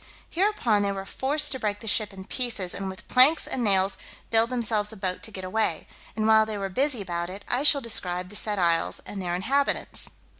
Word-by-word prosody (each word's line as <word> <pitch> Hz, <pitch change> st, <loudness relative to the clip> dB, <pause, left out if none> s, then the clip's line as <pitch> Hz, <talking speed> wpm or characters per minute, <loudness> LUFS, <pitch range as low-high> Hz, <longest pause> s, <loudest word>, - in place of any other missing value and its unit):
Hereupon 340 Hz, -, +1 dB
they 200 Hz, 0 st, -1 dB
were 195 Hz, -1 st, -6 dB
forced 295 Hz, +7 st, -1 dB
to 260 Hz, -, -3 dB
break 205 Hz, -2 st, -3 dB
the 225 Hz, -, -10 dB
ship 215 Hz, 0 st, +1 dB
in 190 Hz, -1 st, -11 dB
pieces, 225 Hz, -8 st, +2 dB
and 195 Hz, -1 st, -5 dB
with 190 Hz, +4 st, -11 dB
planks 270 Hz, +6 st, +5 dB
and 250 Hz, -, -3 dB
nails 195 Hz, -2 st, +2 dB, 0.3 s
build 225 Hz, +1 st, +3 dB
themselves 225 Hz, -4 st, 0 dB
a 220 Hz, -, -11 dB
boat 185 Hz, -1 st, -3 dB
to -, -, -2 dB
get 190 Hz, -2 st, -8 dB
away; 185 Hz, -3 st, -2 dB, 0.3 s
and 215 Hz, 0 st, -2 dB
while 220 Hz, 0 st, +5 dB
they 215 Hz, -1 st, -5 dB
are 195 Hz, -1 st, -4 dB
busy 255 Hz, +2 st, 0 dB
about 175 Hz, -1 st, -4 dB
it, 195 Hz, +2 st, -10 dB
I 245 Hz, -, 0 dB
shall 290 Hz, -1 st, +7 dB
describe 180 Hz, -6 st, -2 dB
the 205 Hz, -, -11 dB
said 210 Hz, 0 st, -2 dB
isles 170 Hz, -2 st, +1 dB
and 200 Hz, -, -7 dB
their 175 Hz, -1 st, -3 dB
inhabitants. 275 Hz, +10 st, -1 dB
210 Hz, 220 wpm, -25 LUFS, 190-245 Hz, 0.3 s, shall